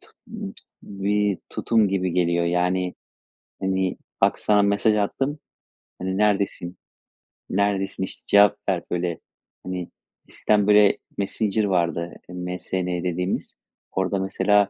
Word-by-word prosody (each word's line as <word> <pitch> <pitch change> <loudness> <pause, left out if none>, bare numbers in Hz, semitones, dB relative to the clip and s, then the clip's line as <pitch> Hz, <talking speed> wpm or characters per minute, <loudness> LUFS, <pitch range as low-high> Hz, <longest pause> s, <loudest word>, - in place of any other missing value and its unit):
t - - -18 0.7
bir 100 0 0
tutum 110 -3 +2
gibi 95 -2 0
geliyor 85 -1 +2
yani, 90 +1 +1 0.7
hani, 95 -1 0 0.2
"Bak - - +3
sana 105 -1 +3
mesaj 100 +2 +3
attım." 135 +8 -1 0.6
hani, 95 +1 -2
"Neredesin? 100 -4 +1 0.7
Neredesin 95 -1 0
işte - - -7
cevap 105 0 +6
ver." 90 -3 0
böyle, 90 -1 -1 0.4
hani, 90 -1 -4 0.4
eskiden 105 -1 +2
böyle 105 -1 +6 0.2
Messenger 105 +1 0
vardı 85 -3 0 0.2
MSN 90 0 -3
dediğimiz. 90 +1 -2 0.3
Orada 95 +1 0
mesela, 100 +1 +3
95 Hz, 110 wpm, -24 LUFS, 90-105 Hz, 0.7 s, cevap